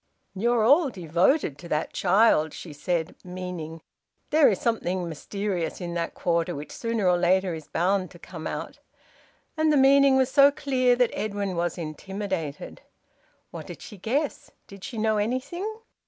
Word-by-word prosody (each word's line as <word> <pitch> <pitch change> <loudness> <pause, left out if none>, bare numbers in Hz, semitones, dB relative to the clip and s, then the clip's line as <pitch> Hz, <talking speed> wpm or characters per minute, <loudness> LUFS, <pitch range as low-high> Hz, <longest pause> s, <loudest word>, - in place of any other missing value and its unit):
"You're 235 +3 +1
all 285 +6 +5
very 185 -8 -9
devoted 170 - +2
to 170 - -9
that 155 -1 -2
child," 185 -5 +3
she 160 - -9
said, 165 +3 -2
meaning, 180 -3 -7 0.5
"There 305 -1 +6
is 195 - 0
something 185 -6 -1
mysterious 180 +2 -3
in 175 -2 -5
that 170 -1 -3
quarter 170 0 0
which 145 +1 -7
sooner 230 -4 -1
or 180 -1 +3
later 185 +1 +2
is 160 -2 -8
bound 185 +2 0
to - - -14
come 165 -2 -8
out." - - -6 0.8
And 315 -1 +2
the 295 - +4
meaning 275 0 +6
was 260 0 +2
so 280 0 +7
clear 260 -4 +1
that 245 -1 +2
Edwin 200 -3 -3
was 170 +1 -1
intimidated. 175 -1 -5 0.7
What - - -8
did - - -9
she 210 - -10
guess? 270 - -2 0.2
Did 195 -1 -13
she 235 - -6
know 220 0 +1
anything? 260 - -2
190 Hz, 165 wpm, -26 LUFS, 170-245 Hz, 0.8 s, so